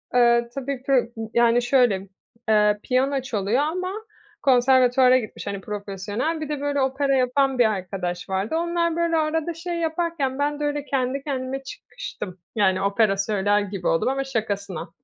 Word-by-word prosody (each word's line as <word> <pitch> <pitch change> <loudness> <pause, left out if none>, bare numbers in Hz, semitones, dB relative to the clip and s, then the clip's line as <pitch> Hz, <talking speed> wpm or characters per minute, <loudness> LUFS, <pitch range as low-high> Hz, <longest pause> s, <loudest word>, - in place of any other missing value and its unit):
eee, 235 -1 +4
tabii, 275 -1 -4
pı 260 -4 +2 0.2
yani 235 0 +4
şöyle, 240 -6 +2 0.4
eee, 210 -1 +4
piyano 265 +2 +1
çalıyor 225 -2 -1
ama 365 +4 -2 0.5
konservatuvara 255 0 +5
gitmiş, 215 -4 -8
hani, 200 -1 -4
profesyonel. 205 - -3
Bir 305 - -4
de, 295 -2 -3
böyle, 285 -1 0
opera 270 +1 +1
yapan 265 +1 +1
bir 240 - +6
arkadaş 185 -4 -3
vardı. 190 +9 -1
Onlar, 340 0 0
böyle, 335 -1 +1
arada 320 +1 0
şey 340 +2 -5
yaparken 325 -5 -1
ben 290 +1 0
de - - -3
öyle 290 -1 -2
kendi 270 0 -1
kendime 270 -1 -3
çıkıştım, 265 - -8 0.2
yani, 190 -3 +2
opera 200 0 +2
söyler 205 0 +1
gibi 195 -2 -4
oldum 165 +9 +2
ama 270 +1 -1
şakasına. 200 -9 -3
255 Hz, 155 wpm, -23 LUFS, 210-285 Hz, 0.5 s, bir